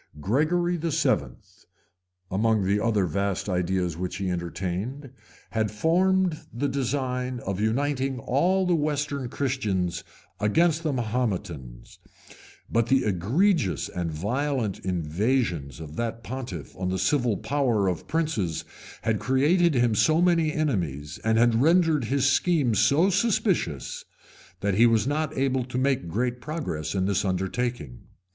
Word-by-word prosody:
Gregory 165 Hz, -, +1 dB
VII., 160 Hz, -1 st, 0 dB, 1.0 s
among 110 Hz, +2 st, +2 dB
the 100 Hz, +2 st, +2 dB
other 110 Hz, -4 st, +2 dB
vast 100 Hz, +3 st, -1 dB
ideas 90 Hz, -2 st, 0 dB
which 90 Hz, +2 st, -4 dB
he 95 Hz, -2 st, -2 dB
entertained, 95 Hz, -, -4 dB, 0.4 s
had 110 Hz, -1 st, 0 dB
formed 175 Hz, -, +2 dB
the 125 Hz, +5 st, -1 dB
design 130 Hz, -2 st, -2 dB
of 95 Hz, 0 st, -3 dB
uniting 135 Hz, +4 st, 0 dB
all 175 Hz, +11 st, +1 dB
the 180 Hz, -, +2 dB
western 145 Hz, -4 st, -1 dB
Christians 105 Hz, -11 st, -1 dB, 0.4 s
against 155 Hz, +10 st, +2 dB
the 160 Hz, -3 st, -1 dB
Mahometans; 100 Hz, -, -3 dB, 0.7 s
but 115 Hz, 0 st, +1 dB
the 135 Hz, +1 st, +3 dB
egregious 110 Hz, -, +1 dB
and 85 Hz, -2 st, -3 dB
violent 115 Hz, -, -1 dB
invasions 90 Hz, -, -1 dB
of 80 Hz, -1 st, -9 dB
that 115 Hz, 0 st, -3 dB
pontiff 120 Hz, -, -6 dB
on 90 Hz, 0 st, -2 dB
the 95 Hz, -, -1 dB
civil 115 Hz, +3 st, +1 dB
power 125 Hz, -8 st, +1 dB
of 90 Hz, -2 st, -2 dB
princes 150 Hz, -, -1 dB, 0.4 s
had 110 Hz, -2 st, +1 dB
created 150 Hz, +5 st, +3 dB
him 120 Hz, -2 st, +3 dB
so 155 Hz, +9 st, +3 dB
many 170 Hz, -3 st, +3 dB
enemies, 85 Hz, -, -2 dB
and 110 Hz, 0 st, +2 dB
had 115 Hz, 0 st, +4 dB
rendered 160 Hz, -3 st, +3 dB
his 135 Hz, +3 st, +1 dB
schemes 140 Hz, -, +2 dB
so 145 Hz, -, +4 dB
suspicious, 195 Hz, -, 0 dB, 0.6 s
that 100 Hz, -1 st, +1 dB
he 115 Hz, +5 st, +5 dB
was 115 Hz, -2 st, +2 dB
not 150 Hz, +1 st, -1 dB
able 130 Hz, -1 st, +1 dB
to 125 Hz, 0 st, -5 dB
make 130 Hz, -8 st, +1 dB
great 120 Hz, +7 st, -2 dB
progress 100 Hz, -, -4 dB
in 95 Hz, -1 st, +1 dB
this 100 Hz, 0 st, +1 dB
undertaking. 95 Hz, -, -2 dB
120 Hz, 135 wpm, -26 LUFS, 95-145 Hz, 1.0 s, he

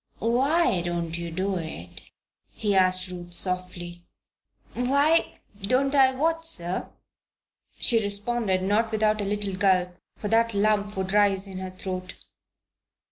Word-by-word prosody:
"Why 250 Hz, -, +1 dB
don't 170 Hz, -1 st, -3 dB
you 170 Hz, 0 st, -5 dB
do 190 Hz, +3 st, -2 dB
it?" 160 Hz, -, -8 dB, 0.5 s
he 210 Hz, -2 st, -1 dB
asked 185 Hz, -1 st, +2 dB
Ruth, 175 Hz, -1 st, -8 dB
softly. 180 Hz, -1 st, -1 dB, 0.7 s
"Why 280 Hz, +6 st, +1 dB, 0.2 s
don't 255 Hz, +7 st, +1 dB
I 265 Hz, -2 st, +4 dB
do -, -, -10 dB
what, 325 Hz, +3 st, 0 dB
sir?" 180 Hz, -, 0 dB, 0.9 s
she 230 Hz, -3 st, +4 dB
responded, 205 Hz, -1 st, +1 dB
not 215 Hz, +3 st, +1 dB
without 215 Hz, -1 st, +1 dB
a -, -, -2 dB
little 205 Hz, -1 st, -3 dB
gulp, 185 Hz, -2 st, +1 dB, 0.2 s
for 210 Hz, -, -5 dB
that 230 Hz, 0 st, +2 dB
lump 205 Hz, 0 st, 0 dB
would 190 Hz, 0 st, -3 dB
rise 200 Hz, -2 st, +3 dB
in 190 Hz, -1 st, -8 dB
her 185 Hz, 0 st, -6 dB
throat. 185 Hz, 0 st, -6 dB
200 Hz, 135 wpm, -25 LUFS, 185-230 Hz, 0.9 s, I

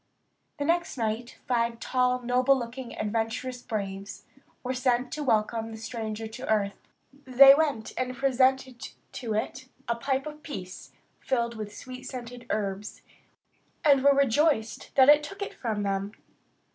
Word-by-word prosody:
The 285 Hz, -, -2 dB
next 340 Hz, -2 st, 0 dB
night 230 Hz, +1 st, -3 dB
five 235 Hz, -2 st, 0 dB
tall, 250 Hz, 0 st, +1 dB
noble 250 Hz, +2 st, +3 dB
looking, 245 Hz, 0 st, -6 dB
adventurous 225 Hz, +4 st, -2 dB
braves 195 Hz, -3 st, -5 dB, 0.4 s
were 255 Hz, 0 st, -2 dB
sent 250 Hz, -1 st, +1 dB
to 305 Hz, -, -4 dB
welcome 225 Hz, -2 st, +1 dB
the 220 Hz, -, -8 dB
stranger 220 Hz, -1 st, -5 dB
to 250 Hz, +4 st, -8 dB
earth. 200 Hz, -2 st, -1 dB, 0.4 s
They 270 Hz, +2 st, +9 dB
went 285 Hz, -7 st, 0 dB
and 255 Hz, 0 st, -2 dB
presented 260 Hz, -1 st, +1 dB, 0.2 s
to 225 Hz, -4 st, -4 dB
it 260 Hz, +4 st, -3 dB, 0.2 s
a 235 Hz, -, +1 dB
pipe 265 Hz, +4 st, -1 dB
of 300 Hz, 0 st, -8 dB
peace, 190 Hz, -, -8 dB, 0.3 s
filled 235 Hz, -3 st, -1 dB
with 210 Hz, -1 st, -7 dB
sweet 255 Hz, 0 st, -9 dB
scented 245 Hz, -1 st, -8 dB
herbs, 200 Hz, 0 st, -3 dB, 0.8 s
and 275 Hz, -3 st, +5 dB
were 280 Hz, 0 st, +6 dB
rejoiced 275 Hz, -3 st, +2 dB
that 265 Hz, -1 st, +7 dB
it 295 Hz, +1 st, +8 dB
took 395 Hz, +7 st, -6 dB
it -, -, -6 dB
from 215 Hz, -4 st, -3 dB
them. 195 Hz, +1 st, -2 dB
245 Hz, 145 wpm, -27 LUFS, 220-265 Hz, 0.8 s, They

